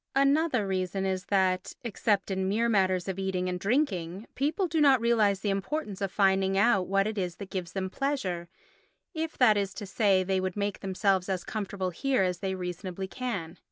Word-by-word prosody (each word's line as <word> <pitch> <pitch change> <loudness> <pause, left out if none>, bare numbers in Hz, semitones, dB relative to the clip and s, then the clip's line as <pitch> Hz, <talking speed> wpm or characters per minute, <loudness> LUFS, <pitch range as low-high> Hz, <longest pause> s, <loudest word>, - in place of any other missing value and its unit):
Another 275 -3 +3
reason 190 0 -1
is 190 0 -2
that, 190 -2 +1
except 210 -3 0
in 190 0 0
mere 225 +4 +2
matters 190 -4 +2
of 190 0 -3
eating 190 -1 -1
and 180 0 -2
drinking, 195 - 0
people 305 +8 0
do 325 -3 0
not 275 -3 +6
realise 220 -4 +2
the 205 - 0
importance 200 +1 -3
of 195 -2 -1
finding 195 -1 +2
out 200 -3 +3
what 195 +1 +2
it 215 -1 -2
is 180 -2 -2
that 200 -2 -9
gives 180 -3 -4
them 190 -1 -2
pleasure 190 -8 -2 0.6
if, 320 -1 -4
that 220 -5 +5
is 195 -1 -2
to 210 - -6
say, 195 -1 +2
they 190 0 0
would 185 +1 -3
make 205 -1 -2
themselves 190 -1 0
as 185 -2 -1
comfortable 195 -3 -3
here 260 +3 +1
as 180 -1 -1
they 190 0 -2
reasonably 185 +1 -5
can. 190 - -5
195 Hz, 190 wpm, -28 LUFS, 185-220 Hz, 0.6 s, not